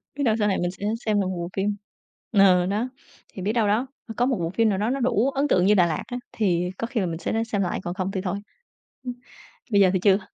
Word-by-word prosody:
Biết 285 - -2
đâu 225 -5 +3
sau 210 - +2
này 195 - +1
mình 175 0 -1
sẽ 195 +2 -7 0.2
xem 210 -2 +2
được 190 - -1
một 185 -1 -3
bộ 170 0 -4
phim 200 +1 0 0.6
ờ, 190 -4 +5
đó, 210 +7 -1 0.4
thì 190 - -7
biết 205 +4 0
đâu 225 -3 +2
đó, 220 +6 +1 0.2
ơ, 225 - -6
có 245 - +3
một 255 -2 +1
bộ 165 - -1
phim 225 +5 +2
nào 195 - 0
đó 210 +4 0
nó 275 - -1
đủ 245 0 +2
ấn 275 +1 0
tượng 180 -9 +3
như 205 - +5
Đà 185 -4 +5
Lạt 160 -3 -2
á, 245 - -4
thì 180 -5 +1
có 230 - -3
khi 240 -1 -2
là 195 - +1
mình 165 -2 -3
sẽ - - -3
đó 225 0 +1
xem 215 -3 -1
lại 180 - -1
còn 175 - -3
không 190 0 -2
thì 190 - -2
thôi. 185 0 -2 0.7
Ưm. 250 -1 -4 0.6
Bây 200 -1 +5
giờ 190 - +6
thì 185 - +2
chưa. 195 +1 +4
205 Hz, 290 wpm, -24 LUFS, 185-225 Hz, 0.7 s, giờ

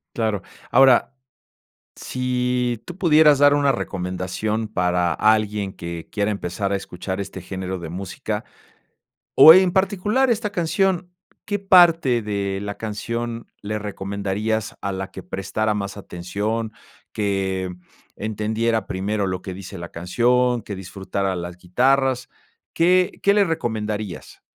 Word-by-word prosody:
Claro. 110 -4 0 0.3
Ahora, 130 0 +5 0.8
si 125 -2 -1
tú 175 - -8
pudieras 155 -6 +5
dar 145 0 +6
una 140 -1 +3
recomendación 95 +2 -3
para 90 -3 +1
alguien 105 -2 +1
que 85 -2 -7
quiera 105 0 0
empezar 100 0 -3
a - - +2
escuchar 95 0 -5
este 100 - -6
género 95 -1 -5
de 85 -2 -7
música, 95 +1 -4 0.9
o 160 - +11
en 185 0 +5
particular 200 +7 +1
esta 215 -3 0
canción, 180 0 0 0.3
¿qué 205 -1 -2
parte 170 -10 +5
de 100 -2 -2
la 100 0 -4
canción 115 +2 -4
le 105 +1 -3
recomendarías 100 +1 -3
a 100 - -2
la 95 0 -5
que 95 - -9
prestara 100 +4 -2
más 100 -1 -4
atención?, 105 +5 -3 0.4
que 95 -3 -1 0.4
entendiera 110 +1 -1
primero 100 +2 -2
lo 90 -1 -3
que 95 - -6
dice 95 -1 -9
la 85 0 -7
canción, 120 +7 +1
que 100 - -7
disfrutara 95 +1 -3
las 85 0 -6
guitarras, 130 +7 +1 0.4
¿qué 180 +2 +3
qué 200 - +5
le 205 0 +4
recomendarías? 110 - -4
105 Hz, 130 wpm, -22 LUFS, 95-130 Hz, 0.9 s, o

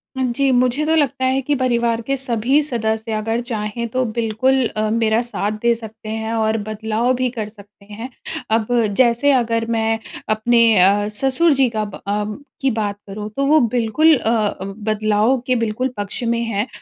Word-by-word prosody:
जी, 260 +1 0
मुझे 255 +4 +2
तो 320 +1 +2
लगता 275 -4 +1
है 260 +1 +1
कि 295 - +2
परिवार 235 -3 +1
के 275 +4 -1
सभी 255 +2 +1
सदस्य 220 -4 -2
अगर 225 +2 -1
चाहें 220 +1 -3
तो 255 +3 -1
बिल्कुल 235 +3 +1
अ, 215 0 -2
मेरा 225 0 +2
साथ 235 -4 -3
दे 235 0 +3
सकते 220 -1 -10
हैं 220 +1 -3
और 220 -1 +1
बदलाव 220 +3 0
भी 255 0 0
कर 225 -3 -5
सकते 205 -1 -18
हैं। 230 +5 -6 0.5
अब 220 -2 -3 0.3
जैसे 250 +3 +4
अगर 230 -3 +1
मैं 225 0 0 0.3
अपने 230 +2 +3 0.2
अ, 200 +3 +4
ससुर 275 +6 +3
जी 270 -2 +3
का 215 -2 -2
ब 205 - -10
अ, 205 +1 0 0.4
की 270 -1 +2
बात 210 -3 -2
करूँ 210 +2 -6
तो 275 - +1
वो 305 +3 +5 0.2
बिल्कुल 275 +8 +4
अ, 220 -3 +1
बदलाव 215 +4 0
के 255 - +2
बिल्कुल 230 +2 -1
पक्ष 205 +4 -4
में 235 0 0
हैं 220 -1 -1
230 Hz, 180 wpm, -19 LUFS, 215-255 Hz, 0.5 s, वो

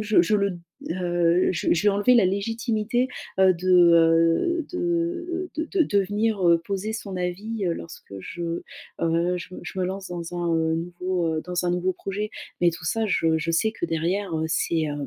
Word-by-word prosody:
je 210 -3 +4
je 210 +5 +1
le 200 -3 -1 0.3
heu, 175 0 +2
je - - -2
je 170 - +1
vais - - +6
enlever 205 +5 +3
la 230 -5 +5
légitimité, 225 +4 0 0.3
heu, 190 -1 +6
de, 185 +2 -4
heu 170 - +4
de, 355 - -3
heu 345 +1 -1
de 315 - -1
de 390 - -1
de - - +1
devenir, 205 -1 +1
heu, 170 0 +6
poser 200 +5 -4
son 200 -4 -5
avis, 195 +5 -3
heu, 170 - 0
lorsque 165 - -10
je 175 - -7 0.6
heu, 170 +2 +1
je 175 - -8
je 180 - -7
me 185 - +1
lance 190 +1 -5
dans 175 0 -6
un 170 -1 0 0.2
nouveau, 175 +1 -2
heu 155 - -2
dans 180 0 -2
un - - +2
nouveau 180 +1 0
projet. 205 +3 -4 0.3
Mais 175 -1 +5
tout 160 - -9
ça 225 +6 0
je 165 -4 +2
je 165 +1 -2
sais 220 +7 +2
que - - -3
derrière, 170 +3 -1
heu, 160 - -1
c'est, 165 0 0
hem 145 -2 -3
185 Hz, 200 wpm, -24 LUFS, 170-215 Hz, 0.6 s, vais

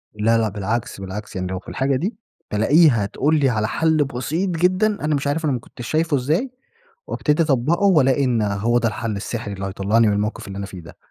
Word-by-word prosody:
لا 110 +2 +2
لأ، 110 -1 +1
بالعكس، 105 +1 -3
بالعكس 100 +2 -7
يعني 95 0 -2
لو 95 0 -4
في - - -21
الحاجة 135 +1 0
دي 180 - -2 0.4
بالاقيها 115 +1 +4
تقول 150 +9 +1
لي 135 -2 +3
على 110 -3 0
حل 160 +2 +2
بسيط 140 +8 -2
جدًا، 180 +4 +2 0.2
أنا 155 -1 +1
مش 140 0 -2
عارف 155 +3 -1
أنا 145 - +1
ما 125 - -2
كنتش 120 +1 -10
شايفه 160 -1 +1
إزاي، 160 - 0 0.6
وأبتدي 150 +2 +1
أطبّقه 150 +5 +1
وألاقي 140 -7 +4
إن 120 -4 +1
هو 105 +3 +1
ده 120 - +1
الحل 110 0 -3
السحري 105 0 -4
اللي 95 0 -5
هيطلعني 100 +4 +2
من 105 - +2
الموقف 105 +1 -2
اللي 100 0 -7
أنا 100 - -4
فيه 95 -2 -9
ده. 85 - -14
120 Hz, 215 wpm, -21 LUFS, 105-155 Hz, 0.6 s, بالاقيها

